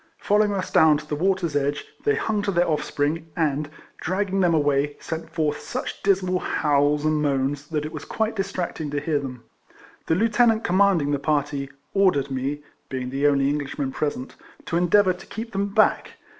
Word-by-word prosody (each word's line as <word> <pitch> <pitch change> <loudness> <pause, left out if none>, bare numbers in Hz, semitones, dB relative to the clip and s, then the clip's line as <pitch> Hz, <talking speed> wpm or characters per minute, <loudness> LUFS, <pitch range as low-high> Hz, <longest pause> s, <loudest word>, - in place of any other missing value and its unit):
Following 210 0 +2
us 185 - -3
down 155 -2 +5
to 150 - -9
the 150 - -2
12 150 - -7
RECOLLECTIONS 185 -5 +1
OF 145 - +3
wator's 140 - 0
edge, - - -8 0.2
they 435 0 +3
hung 215 -2 -1
to 205 - -2
their 175 -1 +2
offspring, 155 +1 -1
and, 150 -2 0 0.3
dragging 195 +2 -1
them 175 -3 +3
away, 145 -1 +1
sent 160 0 -5
forth 155 -3 -1
such - - -5
dismal 185 -2 +2
howls 145 -1 +1
and 155 -1 +2
moans 140 0 0
that 150 -2 -2
it 155 - -5
was 155 - -6
quite 220 0 -2
distracting 185 -6 -3
to 145 0 -1
hear 150 0 0
them. 125 -4 -7 0.6
The 160 - +2
Lieutenant 225 +2 +3
commanding 180 -5 +3
the 145 - 0
party, 145 -1 -1 0.2
ordered 180 -9 +2
me 135 +3 -3 0.3
(being 130 -1 -4
the 140 +2 +2
only 140 -1 +3
Englishman 145 -1 -2
present) 145 -2 -3 0.3
to 170 - -3
endeavour 185 +2 +4
to 180 +2 -13
keep 225 +1 -6
them 200 0 -1
back. 210 +2 +2
155 Hz, 190 wpm, -24 LUFS, 145-190 Hz, 0.6 s, down